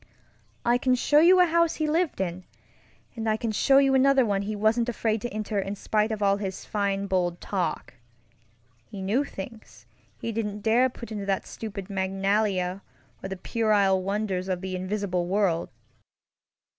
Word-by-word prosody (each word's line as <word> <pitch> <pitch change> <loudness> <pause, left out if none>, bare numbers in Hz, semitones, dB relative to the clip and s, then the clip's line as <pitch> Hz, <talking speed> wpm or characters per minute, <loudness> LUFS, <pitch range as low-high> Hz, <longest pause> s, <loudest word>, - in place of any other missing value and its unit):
"I 240 +1 +3
can 255 0 +2
show 290 +4 +3
you 360 +4 +6
a 360 - +7
house 335 -1 +2
he 310 - -1
lived 325 - 0
in, 185 -1 -3 0.7
and 225 -1 -2
I 215 - +1
can 225 0 -2
show 270 +6 +4
you 275 -1 +4
another 265 -1 +4
one 200 -2 0
he 210 +2 -3
was 215 +2 +2
afraid 230 -2 -1
to 240 - -3
enter 215 -1 -3
in 195 +1 -3
spite 215 +2 0
of 210 -1 -2
all 200 0 +3
his 195 -2 -5
fine 200 -1 -1
bold 180 -3 0
talk. 175 -10 -3 1.0
He 200 - -8
knew 220 +9 +1
things 220 -3 -10 0.3
he 230 - -4
didn't 210 -2 -3
dare 235 +4 +3
put 235 -2 -10
into 205 -2 -5
that 195 -1 0
stupid 200 -4 -7
Magnalia 195 -1 0 0.4
or 190 - -6
that 190 -1 -7
puerile 205 -5 +2
Wonders 195 -1 -2
of 185 -2 -2
the 190 -1 -4
Invisible 185 -1 -2
World. 185 -3 +1
210 Hz, 170 wpm, -26 LUFS, 190-230 Hz, 1.0 s, a